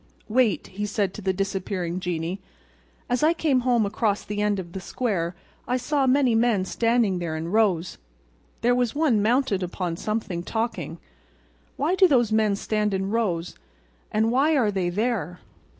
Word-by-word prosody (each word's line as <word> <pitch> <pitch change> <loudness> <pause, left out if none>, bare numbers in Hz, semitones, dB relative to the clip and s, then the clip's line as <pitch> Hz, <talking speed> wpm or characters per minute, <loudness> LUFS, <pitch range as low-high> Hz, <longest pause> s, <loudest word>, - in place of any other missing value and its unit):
"Wait," 225 -3 +2
he 200 +2 -6
said 200 -2 -1
to - - -8
the 190 -1 +1
disappearing 190 -2 -2
genie. 175 +1 -3 0.7
"As 245 -1 0
I 320 +2 +4
came 295 -6 +2
home 240 -3 +2
across 205 0 0
the 210 0 -3
end 210 -1 +1
of 175 -3 -6
the 190 - -5
square 185 -5 -2 0.3
I 250 - +1
saw 270 +2 0
many 260 -2 +3
men 225 -4 +2
standing 230 -3 +1
there 165 -2 -3
in 165 +2 -4
rows. 195 -6 +1 0.6
There 245 +1 +3
was 245 -1 0
one 285 -9 +2
mounted 230 -2 +2
upon 180 -1 -3
something, 210 -5 -3
talking. 185 -6 -3 0.8
Why 300 +6 +1
do 380 0 +6
those 240 -8 +3
men 215 -2 +3
stand 210 0 -1
in 190 +1 -2
rows, 180 -7 -1 0.6
and 220 +1 +2
why 290 +5 +3
are 220 -6 +2
they 190 -3 -1
there?" 195 -4 -2
210 Hz, 165 wpm, -25 LUFS, 185-245 Hz, 0.8 s, do